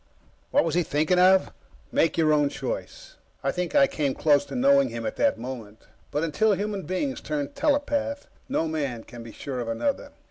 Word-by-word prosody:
_" -, -, -38 dB, 0.5 s
What -, -, +3 dB
was 165 Hz, -2 st, -1 dB
he 175 Hz, -, +3 dB
thinking 155 Hz, +3 st, +1 dB
of? 185 Hz, +1 st, +5 dB, 0.4 s
Make 165 Hz, -, +2 dB
your 155 Hz, -2 st, +4 dB
own 145 Hz, -1 st, +3 dB
choice. -, -, -6 dB, 0.3 s
I -, -, +1 dB
think 180 Hz, +5 st, -3 dB
I 285 Hz, -1 st, +7 dB
came 145 Hz, -, -1 dB
close 145 Hz, -2 st, +3 dB
to -, -, -8 dB
knowing 275 Hz, +2 st, +4 dB
him, 115 Hz, -1 st, -5 dB
at 110 Hz, -, -3 dB
that -, -, +2 dB
moment, 115 Hz, -3 st, -8 dB, 0.3 s
but 150 Hz, -, -1 dB
until 205 Hz, +7 st, +2 dB
human 200 Hz, 0 st, -3 dB
beings 265 Hz, +9 st, -2 dB
turn 290 Hz, -2 st, -3 dB
telepath, 285 Hz, 0 st, 0 dB, 0.2 s
no 255 Hz, -, 0 dB
man 140 Hz, -7 st, -3 dB
can 120 Hz, -1 st, -11 dB
be 115 Hz, -1 st, -9 dB
sure 130 Hz, +1 st, -6 dB
of 120 Hz, -, -4 dB
another. 115 Hz, -, -2 dB
165 Hz, 200 wpm, -26 LUFS, -, 0.5 s, I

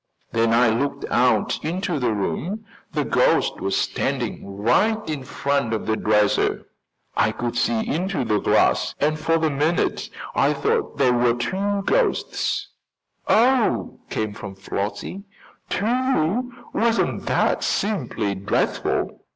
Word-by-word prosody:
When 115 Hz, 0 st, +2 dB
I 115 Hz, 0 st, +4 dB
looked 140 Hz, +6 st, -1 dB
out 120 Hz, -3 st, +2 dB
into 170 Hz, 0 st, -1 dB
the 125 Hz, -3 st, +1 dB
room 135 Hz, -, -3 dB, 0.3 s
the -, -, -1 dB
ghost -, -, +2 dB
was 95 Hz, 0 st, 0 dB
standing 100 Hz, 0 st, -2 dB
right 210 Hz, -, +3 dB
in 150 Hz, -4 st, -3 dB
front 140 Hz, -3 st, -1 dB
of 110 Hz, -, -4 dB
the 110 Hz, -, +1 dB
dresser. 105 Hz, -1 st, +2 dB, 0.5 s
I 110 Hz, -, +3 dB
could 120 Hz, +1 st, -4 dB
see 115 Hz, -1 st, +1 dB
into 175 Hz, -4 st, -1 dB
the 105 Hz, -2 st, +1 dB
glass -, -, +2 dB
and 155 Hz, +1 st, +1 dB
for 165 Hz, +1 st, +2 dB
the 160 Hz, -1 st, +1 dB
minute 155 Hz, +5 st, 0 dB, 0.2 s
I -, -, +3 dB
thought 435 Hz, 0 st, -1 dB
there 130 Hz, -3 st, +4 dB
were 120 Hz, -1 st, +3 dB
two 195 Hz, +11 st, -1 dB
ghosts." -, -, 0 dB, 0.6 s
"Oh!" 245 Hz, 0 st, +2 dB
came 110 Hz, -1 st, -2 dB
from 100 Hz, -1 st, -8 dB
Flossie. 100 Hz, -, -4 dB, 0.5 s
"Two! 245 Hz, -1 st, 0 dB, 0.2 s
Wasn't 230 Hz, 0 st, +1 dB
that -, -, +1 dB
simply 125 Hz, -, -1 dB
dreadful!" 100 Hz, +1 st, -1 dB
140 Hz, 130 wpm, -23 LUFS, -, 0.6 s, I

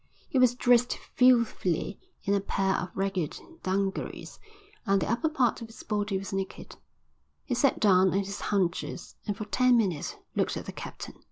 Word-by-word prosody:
He 265 Hz, -, +1 dB
was 250 Hz, -1 st, +5 dB
dressed 245 Hz, 0 st, +3 dB, 0.2 s
filthily 235 Hz, -8 st, +3 dB, 0.2 s
in 200 Hz, -, +1 dB
a 200 Hz, -, +3 dB
pair 195 Hz, -1 st, 0 dB
of 180 Hz, -, -2 dB
ragged 190 Hz, -5 st, -2 dB, 0.2 s
dungarees, 195 Hz, +1 st, -2 dB, 0.4 s
and 195 Hz, -3 st, +2 dB
the -, -, -1 dB
upper 275 Hz, +7 st, +1 dB
part 255 Hz, -8 st, +1 dB
of 230 Hz, -, -6 dB
his 225 Hz, -, -12 dB
body 205 Hz, -2 st, -1 dB
was 195 Hz, 0 st, -6 dB
naked. 195 Hz, -1 st, -5 dB, 0.7 s
He 260 Hz, -, -2 dB
sat 270 Hz, +3 st, +2 dB
down 190 Hz, -3 st, +5 dB
on 190 Hz, -, +1 dB
his 200 Hz, +1 st, -6 dB
haunches 185 Hz, -4 st, -1 dB
and 205 Hz, -1 st, -2 dB
for 215 Hz, -, -4 dB
ten 250 Hz, +3 st, +4 dB
minutes 185 Hz, -10 st, -1 dB, 0.2 s
looked -, -, 0 dB
at -, -, -6 dB
the -, -, -5 dB
captain. -, -, -8 dB
200 Hz, 175 wpm, -28 LUFS, 190-240 Hz, 0.7 s, was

